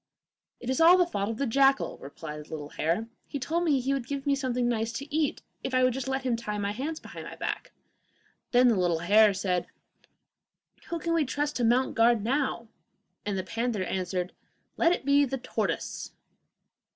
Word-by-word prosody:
'It 240 - -9
is 260 +4 +1
all 345 +3 +8
the 360 - +4
fault 200 - -2
of 225 - -3
the 280 - 0
jackal,' 270 +3 +3
replied 150 +2 -8
the - - -21
little 150 -2 -6
hare. 170 +11 -1 0.2
'He - - -4
told 320 +6 -1
me 295 -5 +3
he 265 +2 0
would 265 -3 -3
give 280 0 -4
me 285 - +3
something 250 -3 0
nice 225 -1 0
to 280 +5 -5
eat 310 -3 0 0.2
if 265 - -2
I 255 - +4
would 255 -1 +4
just 265 0 -4
let 265 0 -1
him 250 -3 +1
tie 210 -2 -4
my 200 0 -1
hands 290 +9 -4
behind - - -9
my - - -8
back.' - - -4 0.8
Then 250 0 +6
the 200 -6 +2
animals 190 +4 +4
said, 180 -3 0 1.2
'Who 340 - -1
can 335 +1 -1
we 330 -2 +3
trust 295 +2 -2
to 245 - 0
mount 245 +3 +3
guard 230 -2 +4
now?' 255 -1 0 0.6
And 200 -2 -1
the 185 - -2
panther 225 0 -2
answered, 180 0 -2 0.4
'Let 335 - +3
it 355 - -1
be 280 0 +5
the 270 -1 -1
tortoise. 255 - -3
245 Hz, 200 wpm, -28 LUFS, 205-275 Hz, 1.2 s, all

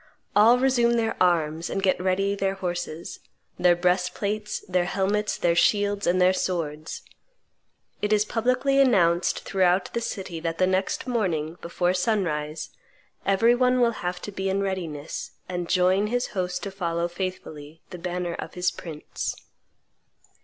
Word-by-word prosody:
All 225 +4 +7
resume 250 -2 +3
their 225 -1 0
arms, 165 -2 +2
and 195 - -2
get 185 - +2
ready 195 +2 +1
their 195 -1 -1
horses, 175 -3 -5 0.4
their 175 -1 +5
breastplates, 185 +4 -1
their 180 -1 0
helmets, 200 +3 0
their 170 - +2
shields, 205 +3 +2
and 180 +1 +3
their 180 +1 +5
swords. 160 -4 -3 1.0
It 210 - 0
is 210 0 +3
publicly 255 +5 +1
announced 180 -9 +3
throughout 185 -1 +1
the 235 - -1
city 190 -6 -4
that 165 0 -3
the 185 - +3
next 185 +1 0
morning, 175 -10 -1
before 175 +1 0
sunrise, 165 -7 -1 0.6
every 200 +5 +4
one 250 +1 +3
will 240 -1 +4
have 180 0 -2
to 205 - -5
be 190 0 -2
in 195 +1 0
readiness, 170 -7 -4
and 175 -1 -4
join 185 +2 +3
his 245 +3 -1
host 180 -2 -3
to 200 - -4
follow 170 -3 -1
faithfully 165 -4 -6
the 180 - -7
banner 175 0 -3
of - - -7
his 180 0 +1
prince." 155 -3 -5
185 Hz, 150 wpm, -25 LUFS, 175-205 Hz, 1.0 s, All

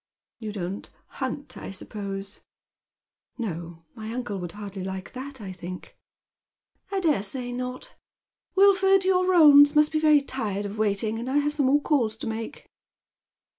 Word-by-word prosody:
" - - -67
You 220 -2 -5
don't 195 -1 -5 0.2
hunt, 280 +2 -5
I - - -7
suppose? 195 0 -7 0.4
" - - -68
" - - -55
No, 170 -7 -5
my 220 0 -7
uncle 235 -5 -4
would 175 -2 -6
hardly 200 -2 -7
like 190 0 -6
that, 265 +1 -7
I 200 -3 -7
think." 180 0 -9 0.5
" - - -43
I 390 - 0
dare 315 - +2
say 245 +5 -4
not. 250 +1 -5 0.6
Wilf 390 0 +6
ord, 385 -1 +4
your 370 -1 +3
roans 295 -4 +8
must 300 0 +5
be 310 - +1
very 305 -2 +5
tired 210 -7 -3
of 205 +2 -6
waiting, 215 +1 0
and 240 +2 -4
I 275 - +1
have 295 0 +1
some 290 -3 +1
more 290 +2 +4
calls 235 -8 +1
to - - -6
make." 225 0 -6
235 Hz, 175 wpm, -26 LUFS, 200-290 Hz, 0.6 s, roans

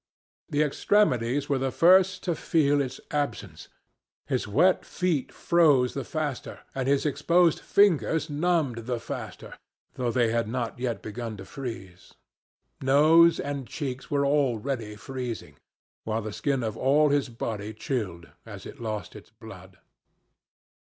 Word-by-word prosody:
The 150 +1 +2
extremities 145 - +1
were 140 -2 0
the 135 0 0
first 185 +5 +4
to 175 - 0
feel 145 -3 +2
its 130 -2 -4
absence. 100 - -3 0.6
His - - -2
wet 180 - +3
feet 175 -7 -1
froze 145 -7 +3
the 135 - -3
faster, 150 -5 -4
and 135 -1 -2
his 140 +1 +2
exposed 165 +4 +3
fingers 160 - +2
numbed 145 -7 -1
the 125 -2 -1
faster, 115 - -8 0.3
though 125 -2 -2
they 120 -1 +1
had 115 -1 0
not 120 0 -3
yet 120 -4 -3
begun 110 0 -6
to 95 - -9
freeze. 95 -7 -8 0.7
Nose 155 +5 +5
and 140 -2 -4
cheeks 135 -4 -5
were 140 -1 +1
already 130 -5 0
freezing, 125 +1 -6 0.5
while 110 0 -2
the 110 -1 -5
skin 130 +4 -1
of 110 -1 -3
all 145 +5 +3
his 140 -2 +1
body 110 -2 -5
chilled 105 -7 -4 0.2
as - - -10
it - - -10
lost 105 -5 -5
its - - -12
blood. - - -13
135 Hz, 140 wpm, -26 LUFS, 115-150 Hz, 0.7 s, Nose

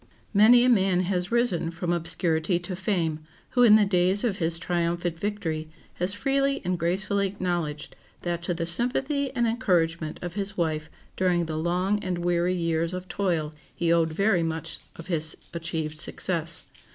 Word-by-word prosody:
Many 225 +4 +7
a - - +4
man 190 -5 +3
has 180 0 -1
risen 235 -9 +1
from 170 +1 -2
obscurity 165 0 0
to 175 +1 -5
fame 175 -5 -1 0.3
who 245 - +2
in 225 -3 +8
the 215 -1 +5
days 185 +1 +3
of 215 -5 0
his 165 -2 +1
triumphant 170 0 -1
victory 165 -7 -3 0.2
has 185 +3 +1
freely 275 +3 +1
and 180 -1 -1
gracefully 195 +3 +1
acknowledged 175 -6 -3 0.3
that 175 -1 -2
to 175 0 -2
the 165 0 -2
sympathy 265 - 0
and 240 -1 +2
encouragement 170 -9 0
of 175 -1 -4
his 200 0 -4
wife 155 -3 -1 0.3
during 180 -2 +1
the 160 -1 -4
long 180 +5 0
and 185 -1 -2
weary 175 +1 +1
years 165 0 -1
of 185 0 -6
toil 170 -7 -1 0.2
he 170 -1 +2
owed 165 -1 +2
very 195 +2 +2
much 160 -1 -3 0.2
of 165 - -10
his 160 -3 -2 0.2
achieved 160 -2 -4
success. 165 -1 0
175 Hz, 165 wpm, -26 LUFS, 165-200 Hz, 0.3 s, in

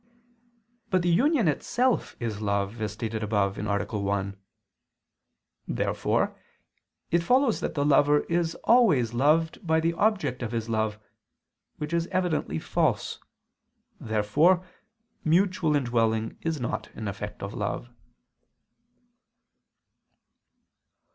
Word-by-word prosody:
But 185 -2 +2
the 175 - +2
union 255 - +3
itself 240 - 0
is 110 -3 -4
love, 100 +2 -1
as 105 -2 -1
stated 110 0 -4
above 100 -2 0
(A. 100 -1 -1
1). 100 -1 -2 1.3
Therefore - - 0 0.8
it 170 - +4
follows 250 +6 +3
that - - -3
the 145 -1 +1
lover 145 0 +4
is 170 -1 -1
always 170 - +4
loved 155 +6 +2
by 160 -4 +2
the 165 +1 +1
object 175 - 0
of 120 -1 -4
his 115 -1 -2
love; 110 -2 -1 0.8
which 150 +2 -5
is 170 0 +1
evidently 175 - -1
false. - - -1 0.8
Therefore 150 - +2 0.6
mutual 170 -1 +2
indwelling 115 -4 0
is 165 -2 -2
not 120 - -3
an 110 - -5
effect 105 +1 -6
of 100 +1 -5
love. 105 +3 -3
135 Hz, 110 wpm, -27 LUFS, 110-170 Hz, 1.3 s, it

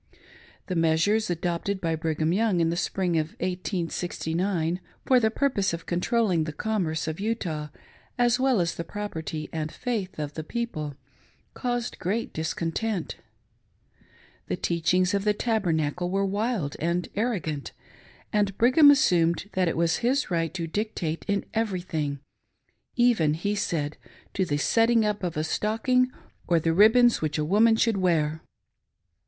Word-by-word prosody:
The 185 - -4
measures 165 +7 +2
adopted 175 +3 -2
by 165 -3 -1
Brigham 160 0 0
Young 205 -2 +2
in 165 0 +2
the - - -1
spring 175 -1 0
of 155 +1 -3
1869, 180 -1 -2 0.3
for 255 -1 +5
the 220 -2 +2
purpose 220 -7 0
of 165 0 -5
controlling 180 -1 +1
the 155 - -4
commerce 165 -2 -2
of 160 +2 -4
Utah, 185 -8 -2 0.5
as 245 0 +3
well 260 -4 +3
as 170 -1 0
the 170 - -5
property 160 -5 -5
and 155 -1 -3
faith 210 -7 -3
of 150 -1 -4
the 155 - -5
people, 155 - -4 0.6
caused 245 -1 -3
great 210 +7 -2
discontent; 165 +5 -2 1.3
The - - -1
teachings 180 +3 +1
of 200 -1 +1
the 210 0 +2
Tabernacle 175 -7 0
were 195 +1 +1
wild 200 - -1
and 170 +2 -1
arrogant, 185 - -2 0.6
and 205 -2 +1
Brigham 265 +6 +6
assumed 180 -8 +3
that 185 -1 +1
it 165 - -1
was 165 -1 +2
his 255 -1 0
right 165 -2 0
to 170 -3 -2
dictate 165 -3 -3
in 200 -1 0
every 215 -5 -1
thing, 150 -5 -3 0.4
" - - -52 0.3
even," 230 -12 +3
he 200 +6 -1
said, 155 -7 -2 0.2
" - - -27
to 190 - 0
the 145 -4 -1
setting 225 - +3
up 210 -1 -1
of 175 -4 -3
a 155 - 0
stocking 225 +9 +1 0.4
or 170 -1 +3
the 165 +1 +1
ril;>bons 225 +6 +5
which 155 -1 -1
a 150 - 0
woman 220 +7 +4
should 225 -2 +2
wear." 160 -4 +1
180 Hz, 155 wpm, -26 LUFS, 160-220 Hz, 1.3 s, Brigham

